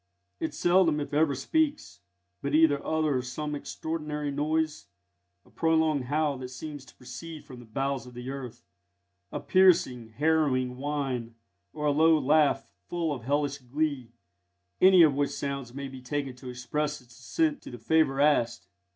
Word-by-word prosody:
It 160 Hz, -2 st, -3 dB
seldom 175 Hz, -3 st, +3 dB
if 145 Hz, -, -5 dB
ever 150 Hz, -1 st, +3 dB
speaks, 300 Hz, -, -1 dB, 0.4 s
but 140 Hz, +1 st, -1 dB
either 155 Hz, -3 st, +4 dB
utters 145 Hz, -6 st, 0 dB
some 150 Hz, +2 st, -4 dB
extraordinary 150 Hz, 0 st, -4 dB
noise 155 Hz, +2 st, -1 dB, 0.6 s
a -, -, -22 dB
prolonged 160 Hz, -4 st, +1 dB
howl 145 Hz, 0 st, 0 dB
that 130 Hz, -, -5 dB
seems 145 Hz, +2 st, -8 dB
to -, -, -18 dB
proceed 150 Hz, +6 st, -9 dB
from 125 Hz, -2 st, -11 dB
the 120 Hz, -, -13 dB
bowels 135 Hz, +3 st, -2 dB
of 125 Hz, -, -13 dB
the 125 Hz, +2 st, -6 dB
earth, 130 Hz, -4 st, -8 dB, 0.7 s
a -, -, -3 dB
piercing, 165 Hz, -11 st, +3 dB
harrowing 140 Hz, -4 st, +1 dB
whine, 135 Hz, -5 st, -3 dB, 0.4 s
or 150 Hz, -, -5 dB
a 145 Hz, -, +4 dB
low 160 Hz, +2 st, +5 dB
laugh 145 Hz, -1 st, +3 dB, 0.2 s
full 170 Hz, -3 st, -1 dB
of 125 Hz, -5 st, -7 dB
hellish 145 Hz, +1 st, 0 dB
glee, 135 Hz, -1 st, -2 dB, 0.7 s
any 185 Hz, -2 st, +8 dB
of 150 Hz, -3 st, +5 dB
which 140 Hz, +1 st, 0 dB
sounds 140 Hz, -3 st, -4 dB
may 140 Hz, +2 st, -6 dB
be 130 Hz, -1 st, -10 dB
taken 135 Hz, 0 st, -3 dB
to 125 Hz, 0 st, -9 dB
express 150 Hz, +4 st, -3 dB
its 120 Hz, -2 st, -19 dB
assent 315 Hz, -4 st, 0 dB
to -, -, -10 dB
the 120 Hz, -, -8 dB
favour 140 Hz, +2 st, +2 dB
asked. 115 Hz, -10 st, +2 dB
145 Hz, 160 wpm, -28 LUFS, 130-155 Hz, 0.7 s, any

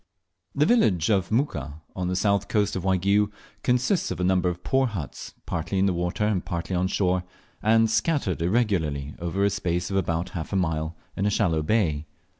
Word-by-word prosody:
THE 145 Hz, +1 st, +3 dB
village 110 Hz, -, +3 dB
of 95 Hz, -1 st, +1 dB
Muka, 80 Hz, -, -1 dB, 0.2 s
on 90 Hz, -1 st, -2 dB
the 90 Hz, -, -1 dB
south 100 Hz, +1 st, +1 dB
coast 105 Hz, -2 st, +1 dB
of 95 Hz, -, -2 dB
Waigiou, 100 Hz, +2 st, +2 dB, 0.3 s
consists 125 Hz, -, +1 dB
of -, -, -4 dB
a -, -, 0 dB
number 90 Hz, -1 st, +2 dB
of 90 Hz, 0 st, -6 dB
poor 135 Hz, 0 st, +2 dB
huts, 95 Hz, -, -6 dB
partly 85 Hz, +4 st, -2 dB
in 95 Hz, -, +3 dB
the 95 Hz, -, +2 dB
water 90 Hz, +4 st, -1 dB
and 105 Hz, -4 st, 0 dB
partly 85 Hz, +2 st, -3 dB
on 90 Hz, +1 st, +1 dB
shore, 95 Hz, -2 st, +1 dB, 0.4 s
and 115 Hz, +1 st, +4 dB
scattered 110 Hz, -, 0 dB
irregularly 85 Hz, -, 0 dB
over 85 Hz, +4 st, 0 dB
a 100 Hz, -, +2 dB
space 90 Hz, -1 st, -1 dB
of 95 Hz, -, +1 dB
about 85 Hz, -2 st, -1 dB
half 80 Hz, -4 st, -6 dB
a -, -, -1 dB
mile 80 Hz, -3 st, -1 dB, 0.2 s
in 100 Hz, -, 0 dB
a -, -, +3 dB
shallow 90 Hz, -6 st, +1 dB
bay. 80 Hz, -5 st, +1 dB
95 Hz, 195 wpm, -25 LUFS, 85-105 Hz, 0.4 s, and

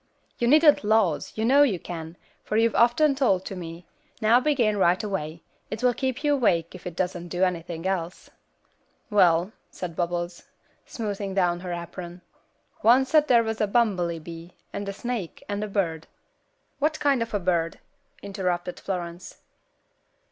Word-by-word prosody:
"You 235 Hz, -, +1 dB
needn't 300 Hz, +1 st, +6 dB
'laws,' 210 Hz, -7 st, +2 dB
you 220 Hz, -, -1 dB
know 275 Hz, +4 st, +5 dB
you 250 Hz, -10 st, +4 dB
can, 165 Hz, 0 st, -8 dB, 0.3 s
for 215 Hz, -, -1 dB
you've 230 Hz, 0 st, +3 dB
often 255 Hz, +5 st, +4 dB
told 235 Hz, -9 st, +2 dB
them -, -, -22 dB
to 195 Hz, -, -5 dB
me; 170 Hz, -1 st, -8 dB, 0.3 s
now 225 Hz, +3 st, +5 dB
begin, 250 Hz, -7 st, +1 dB
right 180 Hz, 0 st, +3 dB
away; 170 Hz, -5 st, -4 dB, 0.3 s
it 220 Hz, +3 st, -5 dB
will 250 Hz, -1 st, +4 dB
keep 260 Hz, +3 st, -3 dB
you 295 Hz, -1 st, +3 dB
awake 175 Hz, -, +1 dB
if 185 Hz, -1 st, -9 dB
it 175 Hz, -, -6 dB
doesn't 175 Hz, -1 st, -2 dB
do 175 Hz, +2 st, -1 dB
anything 170 Hz, -2 st, -2 dB
else." 185 Hz, -2 st, -3 dB, 0.8 s
"Well," 180 Hz, -2 st, +4 dB, 0.2 s
said 175 Hz, -3 st, -7 dB
Bubbles, 175 Hz, 0 st, -2 dB, 0.5 s
smoothing 200 Hz, -3 st, -4 dB
down 175 Hz, -2 st, +2 dB
her 180 Hz, 0 st, -6 dB
apron, 175 Hz, +1 st, -7 dB, 0.6 s
"oncet 265 Hz, +6 st, +5 dB
they 240 Hz, -4 st, +5 dB
was 220 Hz, -1 st, -3 dB
a 210 Hz, -, +2 dB
bummelybee, 175 Hz, -6 st, -1 dB, 0.2 s
and 200 Hz, 0 st, -4 dB
a -, -, -4 dB
snake, 235 Hz, -5 st, -5 dB
and 205 Hz, 0 st, -3 dB
a -, -, -3 dB
bird." 165 Hz, -6 st, -2 dB, 0.7 s
"What 305 Hz, +2 st, 0 dB
kind 280 Hz, -4 st, +2 dB
of 230 Hz, -2 st, -2 dB
a -, -, +1 dB
bird?" 170 Hz, -2 st, 0 dB, 0.5 s
interrupted 180 Hz, -3 st, -3 dB
Florence. 175 Hz, -2 st, -5 dB
195 Hz, 160 wpm, -25 LUFS, 175-230 Hz, 0.8 s, needn't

